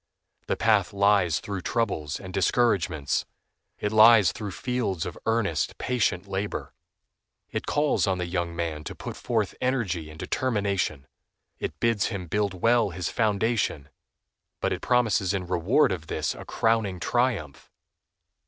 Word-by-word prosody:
The - - 0
path 110 -4 +2
lies 100 -5 +3
through 100 -2 -5
troubles 90 -10 -1
and 95 -1 -9
discouragements. 95 - +1 0.5
It 105 - -2
lies 110 -3 +7
through 105 -1 -6
fields 105 -6 -2
of - - -5
earnest, 110 -8 0
patient 105 -7 0
labor. 100 +1 -4 0.8
It - - -4
calls 150 -6 +2
on 95 -1 +1
the 90 - -2
young 85 -1 -2
man 80 -3 -3
to - - -6
put - - -7
forth 110 -5 -1
energy 105 -12 -1
and 75 - -11
determination. 100 - -1 0.5
It - - -5
bids 115 -3 +2
him 100 -5 -4
build 100 0 -2
well 115 -2 +4
his 90 0 -3
foundation, 105 - 0 0.7
but - - 0
it - - -5
promises 110 -6 +2
in 95 -2 -3
reward 90 - +2
of 80 -4 -4
this - - -1
a - - -10
crowning 110 -5 0
triumph. 115 - -1
100 Hz, 145 wpm, -26 LUFS, 90-115 Hz, 0.8 s, lies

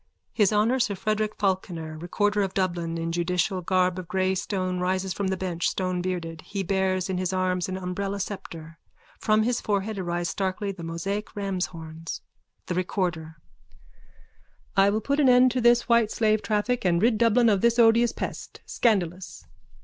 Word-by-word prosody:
_(His 210 -3 +4
Honour, 220 +5 +2
sir 220 -5 +1
Frederick 215 +2 -1
Falkiner, 175 -5 -2
recorder 205 +4 0
of 195 -1 -2
Dublin, 175 -3 -1
in 165 0 -2
judicial 180 +2 0
garb 185 0 +1
of 180 - -8
grey 190 +1 +1
stone 185 -1 -2
rises 185 +1 -1
from 200 - -2
the 190 0 -1
bench, 175 -2 -1
stonebearded. 180 -3 -3
He 200 -1 -4
bears 190 -1 0
in 185 -1 -2
his 185 0 -1
arms 185 -1 0
an 185 - -3
umbrella 195 +2 -3
sceptre. 165 -5 -7 0.4
From 215 0 +3
his 245 +1 0
forehead 205 0 -1
arise 175 -1 -2
starkly 195 +1 -2
the 185 -3 -10
Mosaic 180 +6 -3
ramshorns.)_ 165 -5 -4 0.4
THE - - -3
RECORDER: 175 -3 -2 1.4
I 195 0 +5
will 215 +2 0
put 280 +6 0
an 275 -3 +5
end 250 0 +6
to 255 - -1
this 240 0 +4
white 235 -2 +4
slave 215 -1 +1
traffic 220 +3 0
and 175 -2 +2
rid 225 +2 +2
Dublin 235 +1 +4
of 200 -4 +3
this 235 0 +3
odious 235 0 +5
pest. - - -6
Scandalous! 185 -6 -1
190 Hz, 165 wpm, -26 LUFS, 180-215 Hz, 1.4 s, end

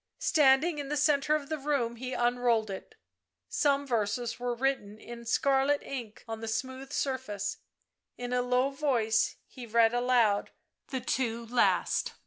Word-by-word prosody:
Standing 300 +1 +3
in 280 -1 -5
the 295 - -1
centre 295 0 +3
of 290 -2 -3
the 315 0 -3
room 270 -5 -1
he 255 +2 -5
unrolled 240 -3 +1
it; 195 - -8 0.5
some 285 -1 +1
verses 230 -1 -1
were 245 0 -2
written 240 -5 -1
in 235 +2 -9
a 235 - -12
scarlet 275 +3 +2
ink 240 -6 -7
on 225 0 -5
the 225 - -5
smooth 260 +5 -4
surface; 260 -9 -2 0.6
in 245 0 -4
a 250 - +2
low 250 +2 +1
voice 235 -6 +1
he 250 -3 -10
read 230 +1 +4
aloud 245 -4 +2 0.4
the 260 -2 -3
two 235 -2 -1
last. 240 +2 +1
250 Hz, 155 wpm, -30 LUFS, 230-275 Hz, 0.6 s, read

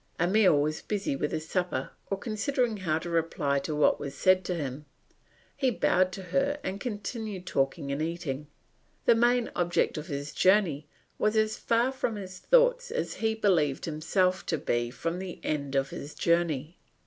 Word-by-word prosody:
Emile 185 -2 +4
was 155 +2 -1
busy 200 -9 -2
with 150 +2 -2
his 155 0 -3
supper 180 -8 -1 0.2
or 195 - -1
considering 230 +2 -1
how 165 -5 0
to 165 - -6
reply 160 -4 0
to 150 +2 -4
what 150 - +3
was 140 - -5
said 185 0 +4
to 180 - -2
him; 145 -2 -4 0.7
he 265 - +2
bowed 185 -5 +2
to 190 +1 -7
her 275 +11 0
and 190 +2 -4
continued 210 -4 -4
talking 140 -1 -1
and 140 +2 -2
eating. 155 -4 -3 0.6
The 235 - +7
main 240 +1 +2
object 175 -2 +1
of 150 - -8
his 145 -2 -4
journey 185 -7 +3 0.3
was 215 +1 +2
as 215 0 +2
far 235 +3 +1
from 250 -4 -2
his 190 -2 -7
thoughts - - +3
as - - -2
he 220 0 +1
believed 170 -10 +2
himself 180 +4 +1
to 160 - +1
be 120 -4 -1
from 165 +7 -3
the 185 -2 -6
end 140 -2 -2
of 135 0 +1
his 145 +2 -7
journey. 170 -2 0
180 Hz, 175 wpm, -28 LUFS, 150-215 Hz, 0.7 s, The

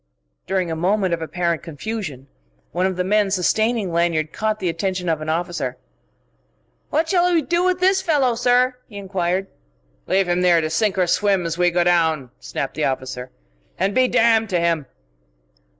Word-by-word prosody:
During 185 -3 -1
a - - -2
moment 185 +2 +1
of 165 - -2
apparent 170 0 -1
confusion, 165 - -6 0.5
one 180 +3 +1
of 190 - -3
the 180 - -1
men 205 +1 +2
sustaining 210 +2 +1
Lanyard 165 -2 0
caught 215 0 -1
the 190 - -3
attention 180 +2 -2
of 160 -2 0
an 155 - -4
officer. 160 -6 -2 1.1
"What 320 +2 +1
shall 360 0 +2
we 330 -3 +2
do 345 +4 0
with 365 0 +1
this 380 +1 +3
fellow, 290 -9 +2
sir?" 250 +2 +2
he 205 - -11
enquired. 190 -1 -1 0.6
"Leave 190 -1 +2
him 175 +1 +1
here 175 -2 +5
to 155 -1 -2
sink 205 +3 +1
or 185 - +3
swim 195 0 +1
as 165 +1 -3
we 175 0 +4
go 175 0 +1
down," 160 -7 +1
snapped 135 - -4
the 155 - -1
officer 130 -1 -3 0.5
"and 195 +2 0
be 255 +2 +4
damned 225 -2 +3
to 180 -3 +1
him!" 165 -4 0
180 Hz, 180 wpm, -21 LUFS, 165-220 Hz, 1.1 s, here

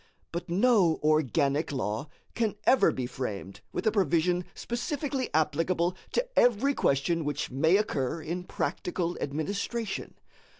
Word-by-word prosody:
But 170 +1 -5
no 190 -3 +4
organic 150 0 +2
law 130 0 -2 0.3
can 225 -3 0
ever 260 - +5
be 130 - -3
framed 105 -7 -5
with - - -3
a 220 - +4
provision 180 -2 +2
specifically 265 +2 -2
applicable 165 +3 +1 0.2
to - - +1
every 245 +4 +4
question 160 - +1
which 145 -2 -2
may 160 +8 +4
occur 160 -8 -1
in 175 +3 -4
practical 175 -1 -2
administration. 200 - -3
170 Hz, 125 wpm, -29 LUFS, 145-210 Hz, 0.3 s, ever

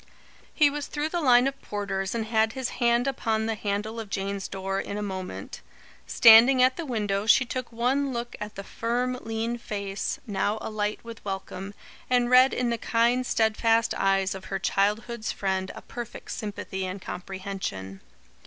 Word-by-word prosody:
He 300 - +4
was 290 0 -4
through 295 +1 -2
the 345 +1 -1
line 250 -3 +6
of 275 0 -3
porters 195 -1 -3
and 225 -1 -1
had 220 0 +2
his 260 -2 -3
hand 235 +1 +3
upon 225 -5 0
the 225 - 0
handle 210 +2 -3
of 220 -3 -6
Jane's 195 0 -3
door 195 0 -3
in 200 - -5
a 210 - -3
moment. 190 -2 -6 0.5
Standing 235 +3 +8
at 255 0 +4
the 335 - -5
window, 210 -4 -1
she 255 +2 +6
took 255 0 -5
one 260 +4 0
look 240 -1 -4
at 210 0 -6
the 195 - -6
firm 240 +4 -1
lean 225 +1 -3
face, 200 -3 -3
now 205 0 -1
alight 210 -1 -3
with 230 -1 -10
welcome, 195 0 -5 0.3
and 245 -1 +2
read 255 +1 +7
in 245 -1 0
the 235 - -1
kind, 240 +2 +2
steadfast 225 +1 +2
eyes 195 -1 +1
of 190 -1 -9
her 195 - -3
childhood's 210 +4 0
friend 190 -1 -2
a - - -10
perfect 240 -2 -8
sympathy 205 -3 -5
and 185 +1 -4
comprehension. 185 - -6
220 Hz, 170 wpm, -26 LUFS, 195-240 Hz, 0.5 s, Standing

